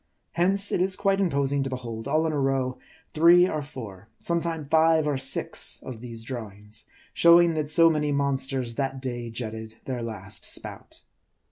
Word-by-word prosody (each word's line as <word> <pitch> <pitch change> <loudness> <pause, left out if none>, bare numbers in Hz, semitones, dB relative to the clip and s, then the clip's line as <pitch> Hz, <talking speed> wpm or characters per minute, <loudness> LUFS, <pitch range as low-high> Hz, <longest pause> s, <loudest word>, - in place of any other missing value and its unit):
Hence, 195 +3 +2
it - - +1
is 190 0 +1
quite 195 0 +1
imposing 140 -6 +1
to 135 - -2
behold, 120 -2 -6
all 155 +3 +2
in 160 - -1
a 145 - 0
row, 135 -2 0 0.3
three 170 +3 +6
or 155 -4 -2
four, 110 -8 -10
sometime 170 -2 -2
five 160 +1 +3
or 145 - +1
six, 135 0 0
of 125 -4 -8
these 115 -1 -7
drawings; 105 -4 -7 0.3
showing 170 0 +6
that 155 -2 -2
so 165 +1 +6
many 150 -2 +1
monsters 135 -3 -1
that 135 +1 -2
day 120 -2 -5
jetted 110 -1 -6
their 125 -2 -3
last 105 -4 -6
spout. - - -6
135 Hz, 165 wpm, -26 LUFS, 120-160 Hz, 0.3 s, three